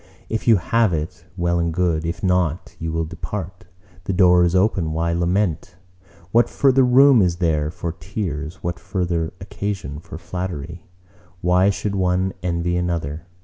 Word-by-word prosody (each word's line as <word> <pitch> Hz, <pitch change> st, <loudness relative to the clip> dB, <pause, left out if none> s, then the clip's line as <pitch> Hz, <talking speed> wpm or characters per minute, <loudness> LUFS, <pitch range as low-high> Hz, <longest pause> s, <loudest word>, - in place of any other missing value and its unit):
if 110 Hz, +1 st, -3 dB
you 115 Hz, -, +7 dB
have 115 Hz, +4 st, +2 dB
it, 80 Hz, +2 st, -4 dB
well 85 Hz, -1 st, +1 dB
and 85 Hz, -1 st, -1 dB
good; 85 Hz, -3 st, +1 dB
if 85 Hz, -, -4 dB
not, 90 Hz, -3 st, 0 dB
you 80 Hz, -1 st, -3 dB
will 80 Hz, 0 st, -1 dB
depart: 90 Hz, +2 st, -6 dB, 0.4 s
the 95 Hz, -, -1 dB
door 90 Hz, -1 st, +5 dB
is 85 Hz, +1 st, +2 dB
open—why 85 Hz, -4 st, +1 dB
lament? 85 Hz, 0 st, 0 dB, 0.6 s
What 120 Hz, +3 st, +4 dB
further 135 Hz, -1 st, +3 dB
room 130 Hz, 0 st, +6 dB
is 90 Hz, -3 st, +2 dB
there 80 Hz, -4 st, 0 dB
for 85 Hz, 0 st, -4 dB
tears? 85 Hz, -2 st, -5 dB
What 85 Hz, -1 st, -3 dB
further 85 Hz, -4 st, -2 dB
occasion 95 Hz, -6 st, -5 dB
for 80 Hz, -1 st, -9 dB
flattery? 85 Hz, -2 st, -6 dB, 0.5 s
Why 90 Hz, +2 st, +4 dB
should 100 Hz, +1 st, -2 dB
one 95 Hz, 0 st, +1 dB
envy 85 Hz, -1 st, -1 dB
another? 85 Hz, -2 st, -3 dB
90 Hz, 150 wpm, -21 LUFS, 85-95 Hz, 0.6 s, you